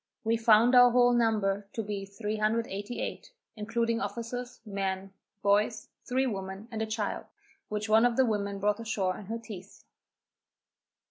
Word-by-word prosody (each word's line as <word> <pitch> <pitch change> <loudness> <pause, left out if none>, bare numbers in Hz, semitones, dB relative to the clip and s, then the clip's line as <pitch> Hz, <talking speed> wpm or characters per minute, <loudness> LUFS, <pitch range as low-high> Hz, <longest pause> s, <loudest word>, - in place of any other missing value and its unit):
We 225 0 +2
found 230 +1 +5
our 245 0 +8
whole 245 0 +4
number 210 -4 +1
to 225 - -2
be 200 -1 -4
388, 215 - -3 0.2
including 230 +2 -1
officers, 245 +2 -5
men, 195 -1 -3 0.3
boys, 210 +2 +2 0.2
three 260 +2 +1
women 195 -2 -5
and 220 -1 -3
a 220 - -1
child, 215 -1 -3 0.4
which 210 +1 -3
one 220 +2 +5
of 235 - -3
the 265 - +5
women 200 -3 -1
brought 205 +1 0
ashore 200 -5 -1
in 200 - -11
her 225 +2 -3
teeth. 205 -5 -11
215 Hz, 145 wpm, -29 LUFS, 200-230 Hz, 0.4 s, our